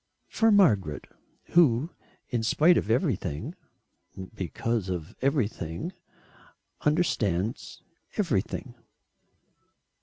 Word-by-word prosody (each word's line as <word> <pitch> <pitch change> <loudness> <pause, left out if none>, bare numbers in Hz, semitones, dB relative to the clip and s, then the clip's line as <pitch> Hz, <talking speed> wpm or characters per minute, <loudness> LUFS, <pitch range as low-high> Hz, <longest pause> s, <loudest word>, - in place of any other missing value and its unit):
"For 225 0 +3
Margaret 105 - +3 0.5
who 155 -2 +4 0.4
in 120 -3 -1
spite 155 +10 +4
of 105 - 0
everything, 110 - -1 0.8
because 105 +1 -2
of 85 -3 -5
everything 130 - -1 0.9
understands 115 - 0 0.3
everything." - - -1
115 Hz, 70 wpm, -27 LUFS, 95-155 Hz, 0.9 s, who